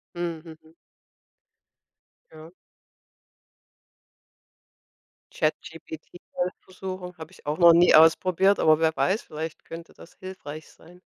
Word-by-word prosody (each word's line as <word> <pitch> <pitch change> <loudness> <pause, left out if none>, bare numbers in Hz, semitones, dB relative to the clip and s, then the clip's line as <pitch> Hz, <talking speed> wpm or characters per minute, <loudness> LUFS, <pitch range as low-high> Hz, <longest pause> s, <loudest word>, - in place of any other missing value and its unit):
Mhm, 170 -2 -4 0.2
mhm. 160 +1 -22 1.6
Ja. 160 +1 -13 2.8
ChatGPT 160 +1 -5 0.2
mal 180 +1 -2
versuchen- 185 -1 -8
habe 160 - -10
ich - - -20
auch 150 +2 -2
noch 170 -1 +8
nie 175 +1 +5
ausprobiert, 185 +5 +4
aber 155 0 +4
wer 160 -1 +1
weiß, 195 +5 0
vielleicht 160 +1 -8
könnte 165 0 -10
das - - -17
hilfreich 160 -5 -9
sein. 175 +2 -19
165 Hz, 110 wpm, -25 LUFS, 160-180 Hz, 2.8 s, noch